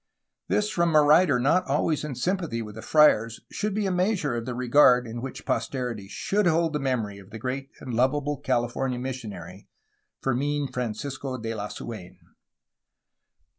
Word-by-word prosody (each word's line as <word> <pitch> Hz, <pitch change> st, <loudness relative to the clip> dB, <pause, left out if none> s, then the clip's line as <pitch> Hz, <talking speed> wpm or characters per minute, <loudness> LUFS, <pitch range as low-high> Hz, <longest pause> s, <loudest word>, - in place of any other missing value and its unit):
This 210 Hz, -, +1 dB
from 170 Hz, -5 st, +1 dB
a 150 Hz, -, +8 dB
writer 150 Hz, -2 st, +5 dB
not 155 Hz, +9 st, +3 dB
always 150 Hz, +2 st, +1 dB
in 150 Hz, -3 st, -4 dB
sympathy 165 Hz, -5 st, -1 dB
with 105 Hz, -1 st, -9 dB
the 110 Hz, -, -8 dB
friars 115 Hz, -7 st, +4 dB
should 210 Hz, -1 st, -2 dB
be 210 Hz, -1 st, 0 dB
a 190 Hz, -, 0 dB
measure 180 Hz, -, +1 dB
of 115 Hz, 0 st, -4 dB
the 125 Hz, -, -3 dB
regard 125 Hz, 0 st, +5 dB
in 115 Hz, +1 st, -6 dB
which 135 Hz, 0 st, -7 dB
posterity 120 Hz, -7 st, -2 dB
should 200 Hz, -, 0 dB
hold 165 Hz, -1 st, +2 dB
the 150 Hz, -, 0 dB
memory 115 Hz, -7 st, -2 dB
of 95 Hz, -1 st, -15 dB
the 110 Hz, -, -8 dB
great 130 Hz, +4 st, -4 dB
and 130 Hz, -3 st, -6 dB
lovable 140 Hz, +4 st, +1 dB
California 125 Hz, 0 st, -1 dB
mis 130 Hz, 0 st, -4 dB
sionary, 95 Hz, -2 st, -9 dB, 0.5 s
Fermin 140 Hz, +2 st, -1 dB
Francisco 130 Hz, +2 st, -4 dB
de 115 Hz, -1 st, -4 dB
Lasuen. 105 Hz, -3 st, -7 dB
130 Hz, 165 wpm, -26 LUFS, 115-150 Hz, 0.5 s, a